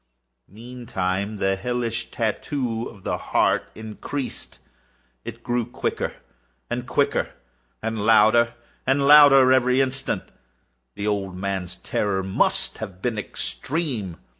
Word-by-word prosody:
Meantime 105 -3 -3
the 95 -1 +1
hellish 115 +1 -2
tattoo 115 +1 -2
of 100 -4 -15
the - - -2
heart - - +1
increased. 110 +5 -6 0.7
It - - -8
grew 120 0 0
quicker 120 - -3 0.6
and - - -3
quicker, - - 0 0.5
and 110 0 -2
louder 115 +2 +5 0.3
and 140 +1 +3
louder 140 -3 +8
every 130 0 +4
instant. 135 0 -1 0.7
The 100 - -4
old 100 -3 -2
man's 95 -2 -3
terror 95 -2 -1
must 95 0 +1
have 95 0 -8
been 115 -4 -1
extreme! 125 - -3
115 Hz, 115 wpm, -24 LUFS, 100-125 Hz, 0.7 s, louder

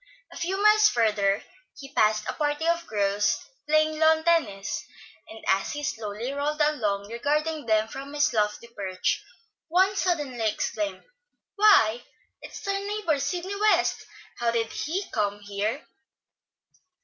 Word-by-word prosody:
A - - -12
few 380 +3 -2
miles 425 +1 +6
further 210 -3 +1 0.3
he 275 0 -11
passed 215 0 +2
a - - -2
party 295 +1 -1
of 335 0 0
girls 205 0 +1 0.3
playing 310 0 +2
lawn 320 0 +4
tennis, 280 - 0 0.5
and 220 - -11
as 190 +1 +1
he 295 0 -5
slowly 225 -2 -3
rolled 295 +2 -2
along 215 -10 0
regarding 300 +5 -1
them 220 0 +3
from 275 +5 -8
his 295 +1 +2
lofty 210 +1 0
perch, 195 -5 -2 0.4
one 375 +4 +3
suddenly 285 - 0
exclaimed: 205 -2 -3 0.5
"Why, 320 - +5 0.4
it's 435 - -9
our 395 0 0
neighbor, 400 -7 -1
Sidney 360 +6 -3
West! 400 -4 +2 0.3
How 240 -1 +1
did 230 -1 -1
he 355 +7 -2
come 205 0 -1
here?" 205 +6 -3
280 Hz, 135 wpm, -26 LUFS, 215-335 Hz, 0.5 s, miles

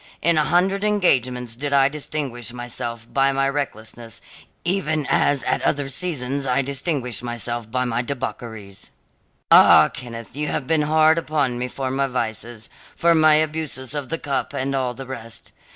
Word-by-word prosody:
In 170 0 +4
a 155 -1 +3
hundred 190 +3 +2
engagements 130 - +1
did 140 +3 -3
I 135 -1 +6
distinguish 140 -5 -4
myself 120 -1 -6
by 135 0 +3
my 135 0 +1
recklessness 115 -4 -4 0.5
even 160 -5 0
as 145 -2 +2
at - - 0
other 140 -1 0
seasons 140 -4 -1
I 130 +2 +2
distinguished 135 - -2
myself 120 -1 -4
by 125 +2 0
my 120 -1 0
debaucheries. 110 -6 -5 0.6
"Ah, - - +8
Kenneth, 115 -2 -8
you 150 +1 -2
have 140 - -2
been 160 +2 +2
hard 155 +1 +5
upon 145 -6 -1
me 125 - -1
for 130 +1 -4
my 135 +1 +1
vices, 115 -2 -4 0.3
for 170 0 +4
my 155 -1 +6
abuses 155 -4 -1
of 145 -3 -4
the 165 - -1
cup, 140 -3 -3
and 135 +1 -1
all 130 -2 -1
the 135 +2 -7
rest. 115 -3 -8
135 Hz, 165 wpm, -22 LUFS, 120-150 Hz, 0.6 s, Ah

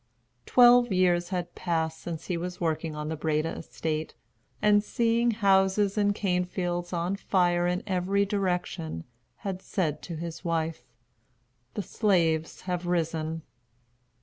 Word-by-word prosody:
Twelve 245 -1 +6
years 175 -2 +2
had 175 -2 -3
passed 160 -2 -1
since 165 -2 -6
he 180 - -2
was 180 +1 -4
working 160 -1 -1
on 150 0 -4
the 160 - -2
Breda 155 +1 -1
estate, 155 0 -4 0.4
and 205 -1 +4
seeing 235 +1 +2
houses 195 -2 +3
and 205 -1 +2
cane 180 -3 +1
fields 175 -1 -3
on 175 +2 -1
fire 175 -3 +2
in 180 +2 -1
every 195 +1 +1
direction, 180 - -2 0.4
had 190 -2 -3
said 165 -8 -2
to 170 - -6
his 165 +1 -6
wife, 165 -2 -1 0.9
"The 205 - -2
slaves 165 -6 +1
have 180 -1 -3
risen." 165 -2 -1
180 Hz, 135 wpm, -28 LUFS, 165-195 Hz, 0.9 s, Twelve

